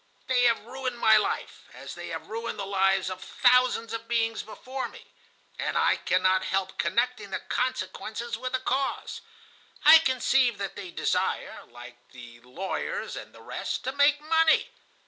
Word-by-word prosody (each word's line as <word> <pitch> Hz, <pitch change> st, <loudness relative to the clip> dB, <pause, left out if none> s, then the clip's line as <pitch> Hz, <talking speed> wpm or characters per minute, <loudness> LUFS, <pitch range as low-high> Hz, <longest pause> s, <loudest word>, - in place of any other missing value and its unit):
They 250 Hz, -1 st, +2 dB
have 230 Hz, -2 st, +2 dB
ruined 255 Hz, 0 st, -4 dB
my 220 Hz, -2 st, +5 dB
life, 210 Hz, -, -2 dB
as -, -, -8 dB
they -, -, -8 dB
have -, -, -6 dB
ruined 230 Hz, +2 st, -5 dB
the 200 Hz, -, -4 dB
lives 195 Hz, -1 st, +2 dB
of 185 Hz, -, -7 dB
thousands 250 Hz, -2 st, +3 dB
of 230 Hz, 0 st, -5 dB
beings 225 Hz, -1 st, 0 dB
before 255 Hz, +4 st, -6 dB
me, -, -, -14 dB, 0.5 s
and -, -, -1 dB
I -, -, +3 dB
cannot 185 Hz, +1 st, +2 dB
help 190 Hz, 0 st, -2 dB
connecting 220 Hz, +3 st, 0 dB
the 195 Hz, -, -2 dB
consequence 215 Hz, -3 st, -3 dB, 0.2 s
with 255 Hz, +3 st, -5 dB
the 255 Hz, -, +1 dB
cause. 265 Hz, +1 st, -2 dB, 0.6 s
I 320 Hz, -, +10 dB
conceive 260 Hz, -4 st, +2 dB
that 195 Hz, -1 st, -5 dB
they 195 Hz, -3 st, -7 dB
desire, -, -, -2 dB
like 120 Hz, 0 st, -12 dB, 0.2 s
the 120 Hz, -2 st, -12 dB
lawyers 190 Hz, -, -4 dB
and -, -, -8 dB
the -, -, -16 dB
rest, -, -, -4 dB
to 260 Hz, -, -2 dB
make 285 Hz, +1 st, +3 dB
money. 320 Hz, +7 st, +3 dB
230 Hz, 165 wpm, -27 LUFS, 190-255 Hz, 0.6 s, I